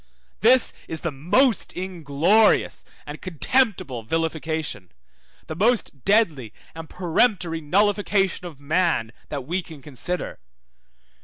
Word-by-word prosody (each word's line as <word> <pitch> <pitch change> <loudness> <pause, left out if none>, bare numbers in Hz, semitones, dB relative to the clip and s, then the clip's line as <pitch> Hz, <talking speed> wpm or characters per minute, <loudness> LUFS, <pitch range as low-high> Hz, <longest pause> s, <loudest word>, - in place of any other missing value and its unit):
This 245 +5 +4
is 160 - -4
the 170 - -2
most 200 - +1
inglorious 180 +3 +2 0.2
and 150 +1 -8
contemptible 185 - 0
vilification, 160 - -3 0.5
the - - -6
most 205 - 0
deadly 165 - +2 0.2
and 160 -1 -9
peremptory 180 -1 +1
nullification 195 +2 +1
of 155 -5 -12
man, 150 -6 0 0.2
that 140 -4 -5
we 175 +6 -1
can 160 -4 -12
consider. 150 +6 -5
165 Hz, 105 wpm, -23 LUFS, 145-200 Hz, 0.5 s, This